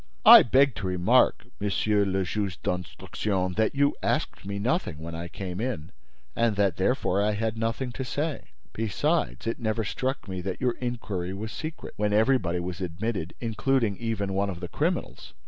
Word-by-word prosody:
"I -, -, +12 dB
beg 135 Hz, +2 st, +4 dB
to 100 Hz, -, -3 dB
remark, 90 Hz, -1 st, +3 dB
Monsieur 105 Hz, +1 st, +1 dB
le 95 Hz, 0 st, 0 dB
Juge 100 Hz, -2 st, -3 dB
d'Instruction, 90 Hz, +2 st, -2 dB
that 110 Hz, +7 st, +1 dB
you 140 Hz, +1 st, +3 dB
asked -, -, -1 dB
me 100 Hz, 0 st, -3 dB
nothing 110 Hz, -, -1 dB
when 85 Hz, +2 st, -7 dB
I 85 Hz, +1 st, -5 dB
came 90 Hz, +2 st, -5 dB
in, 100 Hz, -9 st, -3 dB, 0.4 s
and 115 Hz, -3 st, +2 dB
that 100 Hz, -4 st, +1 dB
therefore 100 Hz, -2 st, +1 dB
I 105 Hz, +1 st, +2 dB
had 110 Hz, +1 st, -1 dB
nothing 115 Hz, +3 st, -2 dB
to 130 Hz, -, -4 dB
say. 145 Hz, +4 st, -3 dB, 0.3 s
Besides, 95 Hz, -, 0 dB
it 115 Hz, +2 st, -2 dB
never 110 Hz, -1 st, -1 dB
struck 130 Hz, +5 st, -3 dB
me 95 Hz, -1 st, -4 dB
that 95 Hz, +1 st, -4 dB
your 125 Hz, -2 st, +1 dB
inquiry 100 Hz, -7 st, -3 dB
was 110 Hz, +3 st, -5 dB
secret, 155 Hz, 0 st, -6 dB
when 105 Hz, 0 st, +1 dB
everybody 105 Hz, -6 st, +2 dB
was 90 Hz, +1 st, -5 dB
admitted—including 110 Hz, +5 st, -1 dB
even 105 Hz, -4 st, -2 dB
one 100 Hz, +1 st, +1 dB
of 90 Hz, -3 st, -5 dB
the 90 Hz, -, -5 dB
criminals!" -, -, -2 dB
105 Hz, 170 wpm, -27 LUFS, 90-115 Hz, 0.4 s, I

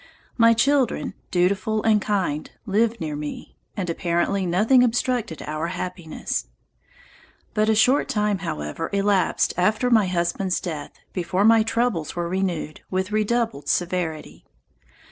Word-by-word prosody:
My 230 Hz, -1 st, +6 dB
children, 265 Hz, -2 st, +1 dB, 0.2 s
dutiful 195 Hz, +4 st, +1 dB
and 215 Hz, -2 st, +3 dB
kind, 185 Hz, -9 st, -1 dB, 0.2 s
lived 225 Hz, +3 st, +1 dB
near 155 Hz, -2 st, -3 dB
me, 150 Hz, 0 st, -7 dB, 0.2 s
and 190 Hz, -3 st, -2 dB
apparently 175 Hz, +3 st, 0 dB
nothing 215 Hz, +9 st, +4 dB
obstructed 240 Hz, -, -1 dB
our 155 Hz, +2 st, -3 dB
happiness. 175 Hz, -2 st, -4 dB, 1.1 s
But 215 Hz, +1 st, +2 dB
a 220 Hz, -, +4 dB
short 250 Hz, +8 st, +3 dB
time, 210 Hz, -5 st, 0 dB
however, 120 Hz, -, -4 dB
elapsed 200 Hz, -1 st, +2 dB
after 215 Hz, +7 st, +2 dB
my 220 Hz, -5 st, +5 dB
husband's 180 Hz, +1 st, 0 dB
death, 155 Hz, -5 st, -6 dB, 0.2 s
before 180 Hz, +2 st, 0 dB
my 225 Hz, 0 st, +6 dB
troubles 225 Hz, -7 st, -1 dB
were 175 Hz, -1 st, -2 dB
renewed 175 Hz, -4 st, -2 dB
with 190 Hz, +1 st, -2 dB
redoubled 215 Hz, -6 st, 0 dB
severity. 175 Hz, -3 st, -2 dB
195 Hz, 125 wpm, -23 LUFS, 170-220 Hz, 1.1 s, My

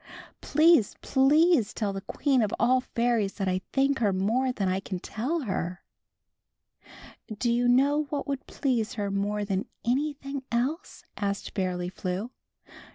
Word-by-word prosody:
Please, 310 Hz, -, +4 dB
please, 285 Hz, -, +3 dB
tell 205 Hz, -3 st, -1 dB
the 195 Hz, -, -5 dB
Queen 270 Hz, +4 st, +1 dB
of 210 Hz, -2 st, 0 dB
All 255 Hz, +2 st, +4 dB
Fairies 235 Hz, -5 st, 0 dB
that 195 Hz, -3 st, -2 dB
I 185 Hz, 0 st, 0 dB
thank 275 Hz, 0 st, +2 dB
her 225 Hz, -, +2 dB
i. -, -, +2 dB
more 225 Hz, +8 st, +1 dB
than 205 Hz, -6 st, -2 dB
I 185 Hz, +1 st, +1 dB
can 190 Hz, -1 st, -5 dB
teU 270 Hz, -, -2 dB
her." 185 Hz, -, -3 dB, 1.0 s
yOfft -, -, -23 dB, 0.4 s
hmri -, -, -10 dB
"Do 240 Hz, +2 st, +1 dB
you 240 Hz, +1 st, +2 dB
know 280 Hz, +5 st, +3 dB
what 290 Hz, -, -3 dB
would 275 Hz, -1 st, -4 dB
please 245 Hz, -5 st, -1 dB
her 205 Hz, -4 st, -3 dB
more 205 Hz, +1 st, -1 dB
than 195 Hz, -1 st, -1 dB, 0.2 s
Jo°Tr\V/ 285 Hz, +5 st, +1 dB
anj^hing 275 Hz, 0 st, -5 dB
else?" 265 Hz, -, -2 dB
asked 200 Hz, -1 st, -3 dB
Fairly 180 Hz, -2 st, -2 dB
Flew. 185 Hz, +5 st, -4 dB
235 Hz, 165 wpm, -27 LUFS, 200-275 Hz, 1.0 s, Please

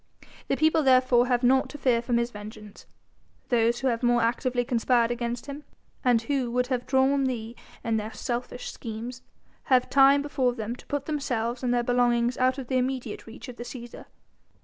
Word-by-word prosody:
The 275 Hz, -, 0 dB
people 315 Hz, +1 st, +3 dB
therefore 255 Hz, -2 st, +4 dB
have 245 Hz, 0 st, +1 dB
naught 265 Hz, +2 st, +3 dB
to 295 Hz, -, -8 dB
fear 245 Hz, -4 st, +2 dB
from 235 Hz, 0 st, 0 dB
his 235 Hz, 0 st, -1 dB
vengeance: 210 Hz, -1 st, -11 dB, 0.6 s
those 235 Hz, 0 st, +2 dB
who 265 Hz, -, 0 dB
have 230 Hz, -1 st, -1 dB
more 240 Hz, -1 st, +3 dB
actively 245 Hz, +1 st, 0 dB
conspired 240 Hz, -1 st, +2 dB
against 240 Hz, 0 st, -3 dB
him, 285 Hz, +1 st, -8 dB, 0.4 s
and 240 Hz, -3 st, +3 dB
who 265 Hz, -1 st, -1 dB
would 250 Hz, +1 st, 0 dB
have 245 Hz, -1 st, -3 dB
drawn 270 Hz, +1 st, +3 dB
thee 235 Hz, -2 st, -4 dB, 0.3 s
in 225 Hz, -1 st, 0 dB
their 215 Hz, +1 st, -4 dB
selfish 245 Hz, +3 st, -4 dB
schemes, 235 Hz, +2 st, -7 dB, 0.4 s
have 255 Hz, -2 st, +2 dB
time 275 Hz, +1 st, +6 dB
before 265 Hz, -4 st, 0 dB
them 225 Hz, +1 st, -4 dB
to -, -, -17 dB
put 285 Hz, -1 st, -3 dB
themselves 250 Hz, -6 st, -2 dB
and 250 Hz, -2 st, 0 dB
their 240 Hz, -1 st, +1 dB
belongings 240 Hz, 0 st, +2 dB
out 255 Hz, +1 st, +2 dB
of 270 Hz, -, -5 dB
the 255 Hz, +1 st, 0 dB
immediate 255 Hz, -1 st, -3 dB
reach 225 Hz, -, -10 dB
of 250 Hz, -1 st, -9 dB
the -, -, -6 dB
Cæsar. 240 Hz, -1 st, -9 dB
245 Hz, 190 wpm, -26 LUFS, 235-260 Hz, 0.6 s, time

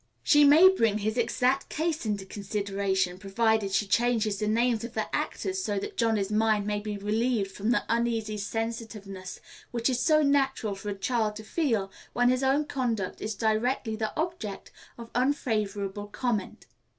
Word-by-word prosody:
She 295 Hz, -2 st, +6 dB
may 300 Hz, +6 st, +8 dB
bring 230 Hz, -, +3 dB
his 215 Hz, +1 st, -1 dB
exact 255 Hz, +3 st, +1 dB
case 315 Hz, -5 st, -2 dB
into 205 Hz, -2 st, -2 dB
consideration, 195 Hz, -2 st, -2 dB
provided 210 Hz, +1 st, +1 dB
she 195 Hz, +2 st, +1 dB
changes 220 Hz, -1 st, +1 dB
the 210 Hz, -, -1 dB
names 230 Hz, +1 st, +1 dB
of 235 Hz, 0 st, -7 dB
the 220 Hz, -, -2 dB
actors, 380 Hz, 0 st, -2 dB
so 205 Hz, -1 st, -1 dB
that 195 Hz, -, -4 dB
Johnny's 220 Hz, -4 st, +1 dB
mind 215 Hz, -1 st, +2 dB
may 210 Hz, 0 st, -1 dB
be 210 Hz, 0 st, -4 dB
relieved 210 Hz, 0 st, 0 dB
from 205 Hz, +3 st, -3 dB
the 240 Hz, -, +2 dB
uneasy 230 Hz, -2 st, 0 dB
sensitiveness 210 Hz, -3 st, -5 dB, 0.3 s
which 235 Hz, +1 st, 0 dB
it -, -, +1 dB
is 250 Hz, -, 0 dB
so 310 Hz, +1 st, +4 dB
natural 270 Hz, -6 st, +1 dB
for 195 Hz, +2 st, -6 dB
a 200 Hz, -, -3 dB
child 215 Hz, +1 st, 0 dB
to 220 Hz, -, -8 dB
feel 220 Hz, -, -1 dB, 0.2 s
when 245 Hz, 0 st, +3 dB
his 255 Hz, +1 st, +2 dB
own 275 Hz, +3 st, +2 dB
conduct 235 Hz, -9 st, -2 dB
is 215 Hz, 0 st, -3 dB
directly 220 Hz, +2 st, 0 dB
the 220 Hz, 0 st, -2 dB
object 320 Hz, -, -4 dB, 0.3 s
of 235 Hz, -1 st, -10 dB
unfavorable 210 Hz, -6 st, -1 dB
comment. 215 Hz, -2 st, -3 dB
220 Hz, 170 wpm, -28 LUFS, 205-245 Hz, 0.3 s, may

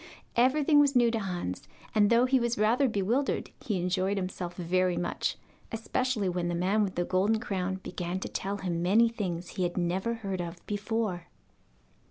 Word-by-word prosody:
Everything 290 Hz, +5 st, +4 dB
was 285 Hz, -2 st, +4 dB
new 240 Hz, -2 st, +5 dB
to 225 Hz, -, -1 dB
Hans, 175 Hz, -, -4 dB, 0.3 s
and 205 Hz, -2 st, +4 dB
though 235 Hz, +1 st, +5 dB
he 260 Hz, 0 st, +3 dB
was 235 Hz, 0 st, 0 dB
rather 235 Hz, +6 st, +3 dB
bewildered 225 Hz, +7 st, 0 dB
he 205 Hz, -5 st, -1 dB
enjoyed 185 Hz, +3 st, 0 dB
himself 185 Hz, -2 st, -4 dB
very 180 Hz, 0 st, +1 dB
much, 175 Hz, -, -2 dB, 0.3 s
especially 225 Hz, -1 st, -1 dB
when 175 Hz, -1 st, -1 dB
the 175 Hz, -, -1 dB
man 195 Hz, +5 st, +2 dB
with 190 Hz, -2 st, -3 dB
the 175 Hz, -, 0 dB
golden 200 Hz, +5 st, +2 dB
crown 190 Hz, -4 st, -2 dB
began 180 Hz, -1 st, -4 dB
to -, -, -3 dB
tell 200 Hz, +1 st, -3 dB
him 175 Hz, -3 st, -2 dB
many 210 Hz, +7 st, +5 dB
things 180 Hz, -6 st, -4 dB
he -, -, -5 dB
had 175 Hz, 0 st, -1 dB
never 185 Hz, +6 st, 0 dB
heard 195 Hz, -5 st, -3 dB
of 170 Hz, 0 st, -7 dB
before. 205 Hz, -4 st, -2 dB
195 Hz, 180 wpm, -29 LUFS, 180-230 Hz, 0.3 s, new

